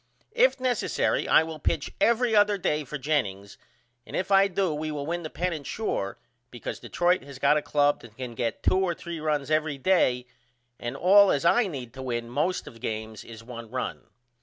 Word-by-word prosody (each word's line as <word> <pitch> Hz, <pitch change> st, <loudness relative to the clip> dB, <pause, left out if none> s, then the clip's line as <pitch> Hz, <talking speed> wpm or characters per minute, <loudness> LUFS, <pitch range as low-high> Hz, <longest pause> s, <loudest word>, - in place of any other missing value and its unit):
If -, -, +3 dB
necessary 255 Hz, -3 st, 0 dB
I -, -, +6 dB
will 160 Hz, -1 st, -7 dB
pitch -, -, -1 dB
every 235 Hz, -1 st, +3 dB
other 205 Hz, 0 st, +4 dB
day 150 Hz, -5 st, 0 dB
for 150 Hz, +2 st, -6 dB
Jennings 100 Hz, -10 st, -2 dB, 0.4 s
and -, -, -9 dB
if 185 Hz, +2 st, -2 dB
I 195 Hz, 0 st, +6 dB
do 190 Hz, -3 st, 0 dB
we 155 Hz, +1 st, -3 dB
will 145 Hz, -2 st, -4 dB
win 170 Hz, +3 st, -2 dB
the 155 Hz, -, -6 dB
pennant 160 Hz, -4 st, -3 dB
sure 100 Hz, -, -3 dB, 0.3 s
because 120 Hz, -2 st, -6 dB
Detroit 175 Hz, +1 st, +1 dB
has 140 Hz, -1 st, -11 dB
got 140 Hz, +3 st, +4 dB
a 150 Hz, -, +2 dB
club 145 Hz, -1 st, +2 dB
that 115 Hz, -2 st, -15 dB
can 125 Hz, -2 st, -6 dB
get 115 Hz, 0 st, -3 dB
2 185 Hz, -, +3 dB
or 185 Hz, -3 st, 0 dB
3 170 Hz, -1 st, -7 dB
runs 150 Hz, -2 st, -1 dB
every 155 Hz, -2 st, +1 dB
day 130 Hz, -6 st, +2 dB, 0.5 s
and 120 Hz, +3 st, -5 dB
all 195 Hz, +5 st, +6 dB
as 140 Hz, -, 0 dB
I 235 Hz, +5 st, +4 dB
need 130 Hz, -8 st, -7 dB
to 130 Hz, -, -8 dB
win 120 Hz, -2 st, -3 dB
most 155 Hz, +8 st, 0 dB
of -, -, -10 dB
my 115 Hz, -, -16 dB
games 110 Hz, -1 st, -5 dB
is 115 Hz, -1 st, -11 dB
1 115 Hz, -1 st, -9 dB
run. 130 Hz, +2 st, -4 dB
150 Hz, 205 wpm, -27 LUFS, 125-180 Hz, 0.5 s, I